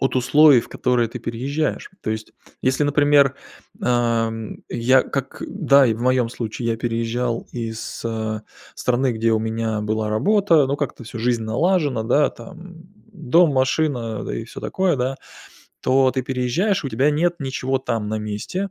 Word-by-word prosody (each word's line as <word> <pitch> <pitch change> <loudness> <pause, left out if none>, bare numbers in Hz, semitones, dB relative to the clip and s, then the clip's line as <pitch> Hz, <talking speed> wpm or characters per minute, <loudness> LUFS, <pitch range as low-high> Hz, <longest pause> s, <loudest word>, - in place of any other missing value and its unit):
от 135 -1 0
условий, 135 +1 +6
в - - -12
которые 125 -2 0
ты 120 - -7
переезжаешь. 135 +7 -3
То 110 - -2
есть 110 0 -5 0.3
если, 130 +3 +1
например, 145 -1 +4 0.4
эм, 115 -2 -1
я 125 +2 +3
как, 135 -1 -5
да, 140 -8 +4
и 115 - +1
в 115 - -9
моём 125 -2 +2
случае, 115 0 -4
я 115 - 0
переезжал 115 +1 -2
из, 115 -2 -5
а, 110 -1 -3 0.3
страны, 125 0 0
где 115 +1 0
у 110 - +3
меня 110 -1 -2
была 110 +1 -1
работа, 165 - +3
ну, 140 +1 -1
как-то 140 -4 -4
всю 115 - -8
жизнь 120 -1 0
налажена, 145 0 +1
да, 135 +6 +2
там, 180 -1 -12 0.4
дом, 165 -1 +3
машина, 130 -4 0
да, - - -4
и - - -4
всё - - -10
такое, 185 -4 0
да. 130 +1 -1 0.6
То 130 0 +3
ты 130 0 -2
переезжаешь- 130 - 0
у - - -1
тебя 130 +6 +2
нет 170 +4 +1
ничего 135 -1 -2
там 115 -5 -3
на 110 0 -2
месте, 105 - -4
125 Hz, 165 wpm, -21 LUFS, 115-145 Hz, 0.6 s, условий